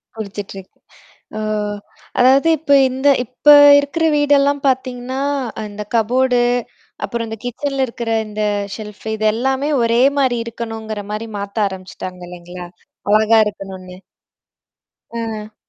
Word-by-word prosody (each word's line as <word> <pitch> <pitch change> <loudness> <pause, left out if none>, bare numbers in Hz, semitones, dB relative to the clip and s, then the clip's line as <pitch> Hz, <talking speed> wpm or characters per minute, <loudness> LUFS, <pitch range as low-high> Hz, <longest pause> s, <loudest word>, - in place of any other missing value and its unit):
குடுச்சிட்ருக். 200 -3 -7 0.7
ஓ! - - -3 0.8
அதாவது 270 +5 +5
இப்ப 285 -1 -1 0.2
இந்த 265 +3 0 0.2
இப்ப 255 +5 -4 0.3
இருக்கிற 285 +4 -1
வீடு 290 0 +3
எல்லாம் 285 0 +1
பாத்தீங்கன்னா, 260 0 -2 0.4
அந்தக் 210 +1 -8
கப்போர்டு, 245 +2 +2 0.6
அப்புறம் 235 -1 -3
இந்தக் 220 +1 -8
கிட்சன்ல 270 +2 -2
இருக்கிற 230 -1 -5 0.2
இந்த 210 0 -4 0.3
ஷெல்ஃப், 210 -1 -10
இதெல்லாமே 260 +7 0
ஒரே 235 +1 +2 0.2
மாதிரி 250 -3 +1
இருக்கணுங்கிற 225 -2 -6
மாதிரி 220 +2 -4
மாத்த 200 +1 -1
ஆரம்பிச்சிட்டாங்க 185 -1 -8
இல்லீங்களா? 175 0 -9 0.5
அழகா 220 +1 +4
இருக்கணும்னு. 190 -3 -7 1.1
அ. 220 -2 -6
230 Hz, 110 wpm, -18 LUFS, 210-260 Hz, 1.1 s, அதாவது